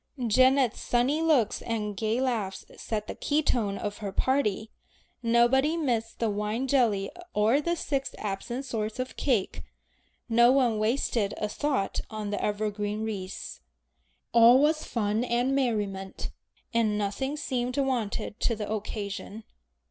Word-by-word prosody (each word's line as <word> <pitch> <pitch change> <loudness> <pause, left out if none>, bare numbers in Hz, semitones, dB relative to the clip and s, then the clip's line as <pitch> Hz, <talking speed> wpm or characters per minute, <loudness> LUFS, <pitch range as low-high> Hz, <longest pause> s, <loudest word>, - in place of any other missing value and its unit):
Janet's 255 +2 +4
sunny 255 +6 +1
looks 290 -10 +2
and 210 -3 -3
gay 220 +4 0
laughs 225 -7 -2
set 215 -2 -3
the - - -5
key 300 +1 0
note 205 -5 -1
of 205 0 -4
her 205 -2 -4
party. 220 -3 0 0.5
Nobody 245 +7 +3
missed 235 -7 -1
the 230 - 0
wine 210 +5 -2
jelly 230 -7 +2 0.2
or 220 +7 +3
the 340 +3 0
six 275 -4 -2
absent 220 +6 -4
sorts 220 -3 -3
of 255 0 -4
cake, 235 -9 0 0.7
no 235 +1 +5
one 250 -5 +3
wasted 220 -2 0
a 210 - -1
thought 265 -2 -1
on 215 -2 -4
the 205 - -2
evergreen 210 0 -1
wreaths. 200 -4 -5 0.7
All 235 +2 +8
was 305 +2 +2
fun 215 0 0
and 245 +2 +1
merriment, 205 -7 -2 0.4
and 220 -3 +2
nothing 215 +8 -2
seemed 250 -2 -2
wanting 255 -9 -1
to 230 - +1
the 210 -1 -4
occasion. 210 0 -5
230 Hz, 140 wpm, -28 LUFS, 210-260 Hz, 0.7 s, All